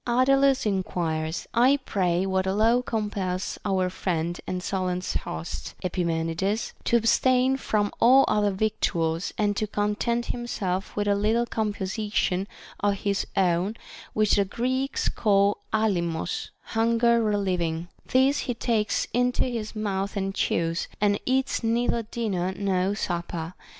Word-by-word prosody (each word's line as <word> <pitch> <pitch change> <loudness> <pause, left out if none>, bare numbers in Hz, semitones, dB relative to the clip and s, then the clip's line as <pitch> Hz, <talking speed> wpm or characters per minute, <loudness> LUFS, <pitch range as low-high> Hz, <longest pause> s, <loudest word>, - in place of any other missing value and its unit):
Ardalns 270 +2 +3
enquires: 170 -5 -1
I 255 +4 +5
pray 180 -2 +1
what 190 0 0
law 220 +5 +3
compels 205 -5 -3
our 190 -2 +1
friend 175 -2 -2
and 180 -1 -3
Solon's 185 -1 -2
host, 80 -2 -5
Epimenides, 170 +3 -1
to 235 - +4
abstain 255 +3 +3
from 210 -6 0
all 260 +3 +7
other 205 -1 +2
victuals, 190 -4 -1
and 205 -1 +1
to 215 - 0
con 205 0 0
tent 235 +3 -1
himself 195 -6 -3
with 205 0 -1
a 205 - +4
little 215 +4 +1
composition 205 -3 -1 0.3
of 205 0 +1
his 200 0 -1
own, 185 +2 +2 0.4
which 215 -1 +3
the 200 - +3
Greeks 260 +6 -1
call 200 -1 +2
άλψος 175 -7 -1 0.2
(hunger 230 +1 +3
relieving) 180 -6 0
\ - - -34
This 265 +3 +4
he 245 - 0
takes 225 -3 0
into 245 +1 +2
his 230 -4 -4
mouth 200 -1 -2
and 195 0 -1
chews, 165 -3 0
and 205 -1 +2
eats 260 0 +1
neither 235 +1 +1
dinner 210 -5 -2
nor 195 0 0
supper. 170 -3 -3
205 Hz, 135 wpm, -26 LUFS, 185-230 Hz, 0.4 s, all